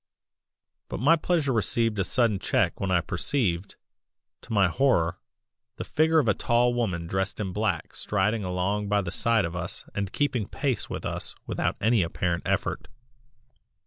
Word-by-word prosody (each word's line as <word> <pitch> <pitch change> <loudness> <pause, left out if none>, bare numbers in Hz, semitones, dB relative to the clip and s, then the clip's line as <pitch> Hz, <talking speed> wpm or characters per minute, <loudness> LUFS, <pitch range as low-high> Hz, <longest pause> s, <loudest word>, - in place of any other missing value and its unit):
But - - -4
my 145 +8 +5
pleasure 155 -4 0
received 115 0 +1
a - - +3
sudden 110 +1 +2
check - - 0
when 100 - -2
I 90 -2 +3
perceived, 95 - -1 0.7
to - - -13
my 100 -4 +4
horror, 85 -6 +1 0.6
the - - -5
figure 160 +1 +2
of 145 -7 +3
a 105 - +4
tall 120 +4 +2
woman 95 -9 -1
dressed 95 +5 -2
in 95 -4 -3
black 105 -6 -2
striding 105 +2 0
along 95 +3 -1
by 105 0 +2
the 90 -3 -5
side 115 0 +2
of 85 0 -5
us 85 -1 -5
and 100 -2 -3
keeping 130 -8 0
pace 135 -5 -1
with - - -5
us - - -3
without - - -1
any 115 0 +3
apparent 85 0 -1
effort. - - -1
105 Hz, 165 wpm, -26 LUFS, 90-120 Hz, 0.7 s, my